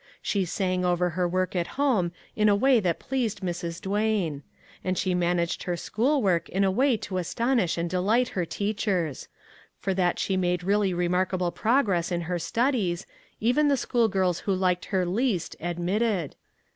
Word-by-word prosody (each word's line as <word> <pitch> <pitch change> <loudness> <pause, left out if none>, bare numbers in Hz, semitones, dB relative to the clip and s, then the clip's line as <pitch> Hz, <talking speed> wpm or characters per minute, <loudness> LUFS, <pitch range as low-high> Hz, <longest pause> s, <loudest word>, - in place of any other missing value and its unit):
She 195 -3 0
sang 185 +1 -1
over 180 0 +1
her 180 +1 0
work 185 +1 -1
at 175 -1 0
home 235 -12 +2 0.2
in 215 0 +3
a 205 - +5
way 255 +3 +4
that 175 -5 0
pleased 240 -6 -2
Mrs. 170 -2 -4
Duane; 200 -7 0 0.4
and 185 0 -1
she 185 - 0
managed 175 -1 0
her 175 -2 -2
school 260 - 0
work 175 -4 +1
in 195 +2 +1
a 190 - +3
way 255 +4 +2
to 190 -2 -4
astonish 230 +1 0
and 170 +1 -1
delight 205 +8 +1
her 180 - -2
teachers; 190 - -2 0.5
for 195 - -1
that 180 -1 +1
she 195 - 0
made 180 -1 0
really 200 +1 +2
remarkable 180 0 0
progress 210 -8 +1
in 175 -1 0
her 175 +1 -2
studies, 195 - 0 0.3
even 250 +7 +3
the 280 -1 +3
school 240 -2 +1
girls 185 -4 0
who 195 - -1
liked 180 -1 0
her 190 -3 0
least, 195 -1 -1
admitted. 175 +1 -1
185 Hz, 170 wpm, -26 LUFS, 175-215 Hz, 0.5 s, a